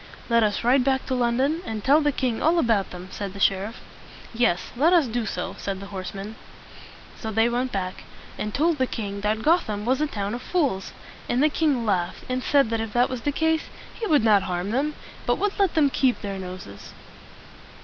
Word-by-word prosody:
"Let 235 Hz, 0 st, +4 dB
us 210 Hz, 0 st, +1 dB
ride 250 Hz, +2 st, +4 dB
back 265 Hz, 0 st, +1 dB
to -, -, -2 dB
London, 255 Hz, +6 st, +1 dB
and 220 Hz, -, -5 dB
tell 290 Hz, +3 st, +5 dB
the 295 Hz, -1 st, +2 dB
king 250 Hz, -4 st, -1 dB
all 330 Hz, +3 st, +3 dB
about 225 Hz, -, +2 dB
them," 180 Hz, +1 st, -9 dB
said 200 Hz, -2 st, -5 dB
the 200 Hz, -, -9 dB
sheriff. 195 Hz, +3 st, +1 dB, 0.5 s
"Yes, 225 Hz, -7 st, +1 dB
let 310 Hz, +8 st, +4 dB
us 335 Hz, -5 st, +5 dB
do 235 Hz, -2 st, -2 dB
so," 180 Hz, -, -3 dB
said 195 Hz, -1 st, -3 dB
the 195 Hz, -, -8 dB
horsemen. 195 Hz, +3 st, -6 dB, 0.8 s
So 220 Hz, -, -4 dB
they 225 Hz, +2 st, +3 dB
went 250 Hz, +2 st, -1 dB
back, 185 Hz, -2 st, -4 dB, 0.3 s
and 210 Hz, -, -3 dB
told 315 Hz, +5 st, +1 dB
the 260 Hz, -, +2 dB
king 200 Hz, -4 st, -4 dB
that 215 Hz, +1 st, 0 dB
Gotham 220 Hz, -11 st, +1 dB
was 260 Hz, +4 st, +1 dB
a 305 Hz, -, +2 dB
town 205 Hz, -6 st, -3 dB
of 245 Hz, -, -4 dB
fools; 270 Hz, -, -1 dB, 0.4 s
and 250 Hz, +3 st, +2 dB
the 305 Hz, -, +5 dB
king 290 Hz, -6 st, +1 dB
laughed, 185 Hz, -4 st, -1 dB
and 255 Hz, 0 st, -1 dB
said 275 Hz, -4 st, +3 dB
that 225 Hz, -1 st, 0 dB
if 225 Hz, -1 st, -5 dB
that 245 Hz, +1 st, +3 dB
was 255 Hz, -2 st, -4 dB
the 290 Hz, -, 0 dB
case, 320 Hz, +2 st, +1 dB, 0.3 s
he 450 Hz, -, -4 dB
would 295 Hz, -, +4 dB
not 210 Hz, -3 st, +5 dB
harm 180 Hz, +1 st, -3 dB
them, 290 Hz, +5 st, 0 dB, 0.3 s
but -, -, +2 dB
would 410 Hz, 0 st, -1 dB
let 390 Hz, -4 st, +2 dB
them 290 Hz, -3 st, +4 dB
keep 260 Hz, -2 st, +1 dB
their 200 Hz, -2 st, -4 dB
noses. 180 Hz, -, -9 dB
235 Hz, 210 wpm, -25 LUFS, 200-280 Hz, 0.8 s, tell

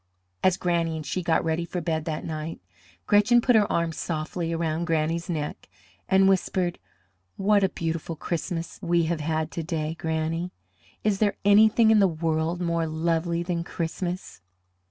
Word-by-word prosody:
As 185 Hz, -1 st, +4 dB
Granny 170 Hz, -2 st, 0 dB
and 155 Hz, -1 st, -5 dB
she 180 Hz, +7 st, -2 dB
got 165 Hz, -2 st, +1 dB
ready 160 Hz, +1 st, 0 dB
for 180 Hz, +1 st, -4 dB
bed 160 Hz, -2 st, -2 dB
that 155 Hz, -2 st, -3 dB
night, 155 Hz, 0 st, -5 dB, 0.5 s
Gretchen 210 Hz, +3 st, +5 dB
put 245 Hz, 0 st, +3 dB
her 210 Hz, -2 st, +4 dB
arms 165 Hz, -1 st, 0 dB
softly 165 Hz, +1 st, -3 dB
around 165 Hz, 0 st, -1 dB
Granny's 165 Hz, +1 st, 0 dB
neck, 150 Hz, -, -4 dB, 0.4 s
and 190 Hz, 0 st, +5 dB
whispered: 185 Hz, -2 st, +1 dB, 0.6 s
"What 200 Hz, +1 st, +3 dB
a 190 Hz, -, +3 dB
beautiful 165 Hz, -1 st, -3 dB
Christmas 170 Hz, +1 st, -4 dB
we 170 Hz, 0 st, +2 dB
have 165 Hz, 0 st, -1 dB
had 155 Hz, +1 st, -1 dB
to 170 Hz, -, -3 dB
day, 160 Hz, -1 st, -3 dB
Granny! 160 Hz, +2 st, -2 dB, 0.5 s
Is 205 Hz, -2 st, +1 dB
there 205 Hz, -2 st, +1 dB
anything 220 Hz, +2 st, +6 dB
in 220 Hz, -, +6 dB
the 195 Hz, -, +5 dB
world 160 Hz, 0 st, -1 dB
more 170 Hz, -1 st, 0 dB
lovely 165 Hz, +2 st, 0 dB
than 170 Hz, -1 st, -2 dB
Christmas?" 175 Hz, -, -4 dB
170 Hz, 160 wpm, -26 LUFS, 160-180 Hz, 0.6 s, anything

